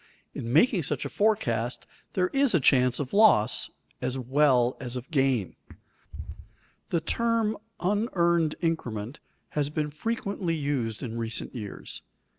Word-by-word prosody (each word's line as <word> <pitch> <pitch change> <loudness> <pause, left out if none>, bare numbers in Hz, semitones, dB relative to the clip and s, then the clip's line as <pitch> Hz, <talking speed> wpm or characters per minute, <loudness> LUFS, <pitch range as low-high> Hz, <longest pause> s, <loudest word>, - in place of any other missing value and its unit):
In 115 - -5
making 185 - +4
such 145 - -2
a - - -3
forecast 125 - 0 0.3
there 180 -1 +1
is 275 -6 +2
chance 125 -2 +4
of 140 -3 -4
loss 200 - +4 0.3
as 125 +1 -1
well 130 -1 +3
as 125 -1 -5
of 125 +6 -7
gain. 135 - +1 1.3
The 170 - 0
term 230 +4 +1 0.2
"unearned 170 -5 +1
increment" 125 -8 -2 0.3
has 145 -1 -1
been 150 0 -2
frequently 200 0 -2
used 140 -7 -2
in 115 -2 -4
recent 115 0 -2
years. 105 -5 -5
145 Hz, 125 wpm, -27 LUFS, 125-185 Hz, 1.3 s, making